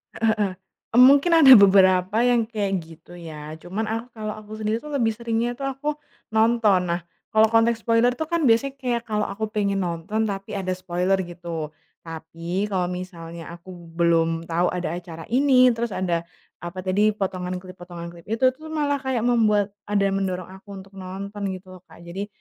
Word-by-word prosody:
Heeh, 220 -1 +2
heeh. 200 -2 +1
Mmm 185 - -14 0.5
mungkin 285 +5 +5
ada 280 -6 +9
beberapa 190 0 +5
yang 240 -1 +3
kayak 210 -3 -3
gitu, 165 +2 -14
ya. 155 -2 -8
Cuman 190 +7 -4
aku 225 +2 -3
kalau 215 -2 -5
aku 215 0 -13
sendiri 215 0 0
tuh 300 - -8
lebih 230 -6 +1
seringnya 235 +1 -2
tuh 275 - -8
aku, 295 +3 -3 0.4
nonton. 220 -4 +3
Nah, 175 - 0 0.3
kalau 220 0 +5
konteks 225 +1 +3
spoiler 230 +1 +3
tuh 310 +5 -4
kan 335 -1 0
biasanya 265 +3 +3
kayak 245 -3 -3
kalau 210 -1 0
aku 215 +2 -3
pengen 200 -2 -1
nonton 180 +5 -2
tapi 195 -1 -5
ada 185 -2 -2
spoiler 185 +1 0
gitu. 170 -3 -6 0.3
Tapi 165 +4 -4
kalau 180 -3 -1
misalnya 170 -2 -8
aku 185 +2 -13
belum 165 -1 0
tahu 170 +2 0
ada 180 -3 -2
acara 165 -2 -10
ini, 255 -1 +5
terus 230 -3 -3
ada 170 -2 -1 0.3
apa 175 +2 -7
tadi 205 +3 +2
potongan 185 -2 -3
klip, 185 0 -10
potongan 170 -1 -8
klip 170 +1 -15
itu 255 +4 +2
tuh 310 +5 -13
malah 290 -3 -1
kayak 260 -4 -2
membuat 210 -4 +2 0.2
ada 205 -1 +1
yang 195 - 0
mendorong 185 -2 -3
aku 195 +1 -11
untuk 195 0 -11
nonton 200 +2 -5
gitu 185 0 -12
loh - - -34
Kak. 170 - -16
Jadi, 190 +4 -6
200 Hz, 185 wpm, -23 LUFS, 175-230 Hz, 0.5 s, ada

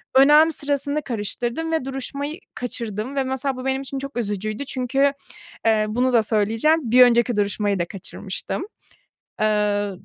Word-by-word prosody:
önem 300 +4 +7
sırasını 285 0 -1
karıştırdım 240 +7 -3
ve 320 -5 0
duruşmayı 280 +4 -5 0.2
kaçırdım 235 +1 -4
ve 270 - +1
mesela 265 0 -2
bu 255 - -6
benim 265 0 0
için 275 0 -5
çok 275 -2 -7
üzücüydü. 215 +4 -3
Çünkü, 270 +2 +1 0.5
eee, 215 -1 +3
bunu 250 +4 +1
da 230 - +5
söyleyeceğim. 225 +7 +1
Bir 250 0 +8
önceki 240 -1 +4
duruşmayı 205 -1 0
da 175 - +1
kaçırmıştım. 195 - -6 0.8
Eee, 210 -1 +1
250 Hz, 145 wpm, -22 LUFS, 215-275 Hz, 0.8 s, Bir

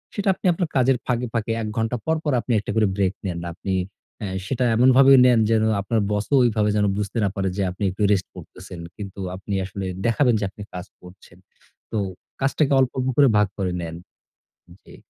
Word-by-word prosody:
সেটা 205 -1 0
আপনি 190 - -12
আপনার 175 +1 -2
কাজের 130 0 +3
ফাঁকে, 125 0 -1
ফাঁকে 115 -1 -1
১ 110 - -3
ঘণ্টা 115 +2 0
পর, 160 - +2
পর 150 - 0
আপনি 125 - -5
১টা 105 - -5
করে 110 -2 +3
ব্রেক 95 -2 +1
নেন। 90 -3 -3
আপনি 95 +2 -4 0.5
আ - - -2 0.2
সেটা 125 +4 -1
এমনভাবে 130 +3 +6
নেন 125 -2 +5
যেন 110 -1 +3 0.2
আপনার 110 +2 0
বসও 105 +7 0
ওইভাবে 110 -3 +2
যেন 105 -1 +2
বুঝতে 105 +3 -3
না 100 - +2
পারে 95 -1 -1
যে 100 - +1
আপনি 95 +3 -6
একটু 95 - -8
রেস্ট 95 -3 +1
করতেছেন। 90 -1 -11 0.2
কিন্তু 100 -1 -8 0.2
আপনি 100 +2 -6
আসলে 95 +1 -6 0.2
দেখাবেন 120 +2 +3
যে 105 - -3
আপনি 105 - -14
কাজ 90 0 -6 0.2
করছেন। 90 0 -16 0.5
তো - - -2 0.4
কাজটাকে 140 +1 +1
অল্প, 130 -2 +2
অল্প 130 0 -1
করে 145 -1 +7
ভাগ 105 - +4
করে 95 -3 -1
নেন। 80 -1 -6 0.9
জি। - - -15
110 Hz, 200 wpm, -23 LUFS, 95-125 Hz, 0.9 s, করে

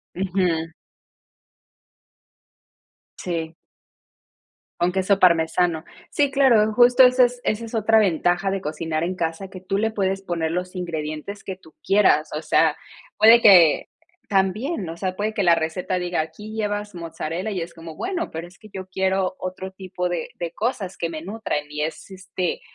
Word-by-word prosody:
Ujú. 180 -3 -1 2.5
Sí. 165 -2 -4 1.3
Con 175 +1 +2
queso 190 +1 +1
parmesano. 165 -1 +3 0.3
Sí, 285 -1 +1
claro, 240 -6 +4
justo 245 +2 +6
esa 250 0 +6
es 245 0 -2
esa 215 +2 -1
es 225 - -11
otra 220 0 +3
ventaja 180 -1 +1
de 195 0 -2
cocinar 155 +1 -3
en 180 +2 -2
casa, 170 +2 -3
que 185 -1 -10
tú 195 +1 -2
le 220 +2 +1
puedes 195 -2 -1
poner 170 -4 -2
los 180 +2 -3
ingredientes 165 +2 -5
que 190 - -5
tú 160 -4 -20
quieras. 190 -6 +3
O 155 - -4
sea, 155 0 +2 0.4
puede 225 +2 +7
que 180 -8 +6 0.4
también, 195 - 0
o 165 - -6
sea, 185 +1 -3
puede 210 +3 -2
que 205 - 0
la 170 -1 +6
receta 170 +3 -2
diga, 175 -2 -1
aquí 210 +8 -7
llevas 205 -1 -3
mozzarella 170 +3 -5
y 190 -4 -3
es 165 - -7
como, 165 -1 -10
bueno, 360 - -3
pero 165 +2 -6
es 180 - -20
que 215 -2 -16
yo 190 -1 -7
quiero 190 0 0
otro 185 +1 -6
tipo 185 -1 -4
de 175 -2 -4
de 170 -1 -3
cosas 210 -4 -3
que 170 - -2
me 155 -1 -6
nutran 195 -5 -3
y 150 0 -3
es, 155 +5 -5
este, 185 -2 -4
185 Hz, 165 wpm, -23 LUFS, 165-205 Hz, 2.5 s, puede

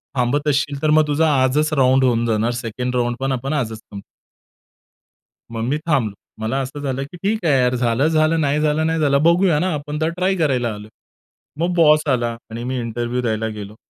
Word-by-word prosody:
थांबत 135 +4 0
असशील 140 0 0
तर 155 - +1
मग 155 0 +4
तुझा 150 +2 +2 0.2
आजच 150 +4 +1
राउंड 130 -2 +3
होऊन 120 -2 +2
जाणार 115 +1 0
सेकंड 125 +2 -4
राउंड 120 0 0
पण 135 0 0
आपण 135 +3 -2
आजच 115 -7 -2
संपवू." 100 -2 -11 1.5
मग 115 -1 -4
मी 150 - +1
थांबलो. 120 -10 +1 0.3
मला 115 +5 -1
असं 135 +3 -6
झालं, 135 -1 -2
की 160 +6 -11
ठीक 200 +1 -2
आहे 140 -4 +3
यार, 125 0 +1
झालं, 120 +3 +1
झालं, 160 0 +2
नाही 145 0 +1
झालं, 155 +1 +1
नाही 165 0 0
झालं. 140 -1 +2
बघूया 170 -1 +3
ना 185 +2 0
आपण 150 +1 -4
तर 160 - +1
ट्राय 185 +1 +1
करायला 130 - 0
आलोय. 105 +1 -10 0.7
मग 175 +2 0
बॉस 155 -2 +4
आला 120 -2 -1 0.2
आणि 115 +1 -6
मी 130 +1 -3
इंटरव्ह्यू 120 +1 -3
द्यायला 110 -2 -1
गेलो. 105 -1 -8
135 Hz, 200 wpm, -20 LUFS, 120-155 Hz, 1.5 s, मग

